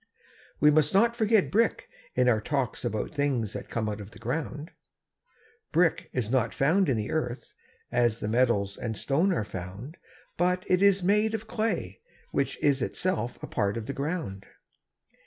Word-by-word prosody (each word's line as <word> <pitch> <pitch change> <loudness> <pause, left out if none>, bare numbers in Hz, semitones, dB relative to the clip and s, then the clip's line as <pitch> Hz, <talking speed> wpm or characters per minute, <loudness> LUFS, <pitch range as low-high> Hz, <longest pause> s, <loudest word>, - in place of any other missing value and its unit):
We 150 +1 +6
must 150 +3 +3
not 235 +4 +4
forget 220 -3 +3
brick 225 +2 +1 0.3
in 125 0 +3
our 110 -3 +3
talks 135 0 -2
about 110 0 -2
things 135 -8 0
that - - -7
come 110 -2 -2
out 105 0 -3
of 100 - -9
the 110 - -15
ground. 145 - -4 1.0
Brick 170 -1 +2
is 120 -3 -2
not 125 -3 +1
found 165 +5 +3
in 125 - +2
the 105 -1 -3
earth, 145 -6 -3 0.4
as 120 -2 +2
the - - -3
metals 110 -4 +1
and 110 -3 -4
stone 160 - +1
are 135 - 0
found; 100 - -8 0.4
but 180 +1 +1
it 185 0 +2
is 200 -2 +4
made 210 +4 +3
of 220 0 -5
clay, 225 0 -2 0.3
which - - -1
is 140 -2 +3
itself 125 -3 -1
a - - -4
part 100 +2 -1
of 115 - -4
the 140 - -4
ground. 140 - -4
140 Hz, 175 wpm, -28 LUFS, 110-180 Hz, 1.0 s, We